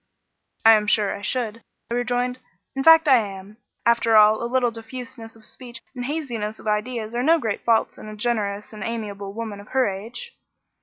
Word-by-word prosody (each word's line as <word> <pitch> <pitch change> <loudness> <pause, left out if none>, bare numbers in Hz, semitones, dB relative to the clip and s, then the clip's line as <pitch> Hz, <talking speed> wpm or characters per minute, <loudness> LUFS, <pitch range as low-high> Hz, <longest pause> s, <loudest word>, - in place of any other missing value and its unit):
"I 225 - +10
am 210 -1 +4
sure 205 -1 +2
I - - -9
should," 230 +1 -2 0.3
I - - 0
rejoined; 245 +1 -1 0.4
"in 270 - -1
fact, 325 0 +7
I 265 -3 +7
am. 200 -1 -5 0.3
After 235 -1 +4
all, 215 0 +6
a 235 - -2
little 250 -2 +2
diffuseness 230 0 -8
of 220 -1 -11
speech 235 -1 -9
and 245 -1 -4
haziness 240 -8 -3
of - - -15
ideas 215 +1 -2
are 240 - 0
no 320 +6 +5
great 220 -9 -3
faults 230 -1 +1
in - - -10
a 215 - -8
generous 210 -2 -2
and 210 -2 -7
amiable 205 -4 -5
woman 220 -2 -5
of 200 - -12
her 260 -1 +2
age." 225 - -7
230 Hz, 195 wpm, -23 LUFS, 210-250 Hz, 0.4 s, I